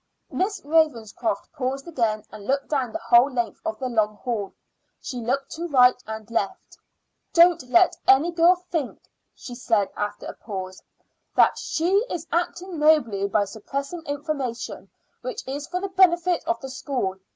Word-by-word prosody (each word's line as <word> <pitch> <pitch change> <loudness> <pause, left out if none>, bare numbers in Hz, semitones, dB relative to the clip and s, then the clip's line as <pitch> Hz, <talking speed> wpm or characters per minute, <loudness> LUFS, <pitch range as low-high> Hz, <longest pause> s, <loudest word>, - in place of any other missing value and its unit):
Miss 400 +2 -1
Ravenscroft 235 -9 0
paused 275 0 -3
again 225 -9 -1
and 205 -1 -10
looked 275 +1 0
down 265 -6 0
the - - -3
whole 240 +4 +4
length 240 -2 -2
of 330 0 -3
the 260 - -3
long 215 -3 +1
hall. 210 -3 -3 0.5
She 250 - -6
looked 270 +4 -2
to 340 +2 -4
right 250 -4 +5
and 220 -1 -6
left. 205 -4 -3 0.5
"Don't 335 -6 +5
let 355 +6 +5
any 275 +6 +5
girl 340 +2 +5
think," 350 -6 -4 0.4
she 245 - -9
said 225 -4 0
after 205 0 -4
a - - -6
pause, 190 -3 -7 0.5
"that - - +4
she 370 +6 +1
is 330 -2 -4
acting 350 +1 -2
nobly 240 -11 +3
by 205 +1 +1
suppressing 275 - -5
information 285 -4 -4 0.3
which - - -6
is 280 +2 -4
for 360 - -2
the 395 +1 -4
benefit 360 -2 +3
of 345 - 0
the 265 - -6
school. 255 -8 -3
275 Hz, 160 wpm, -24 LUFS, 230-335 Hz, 0.5 s, right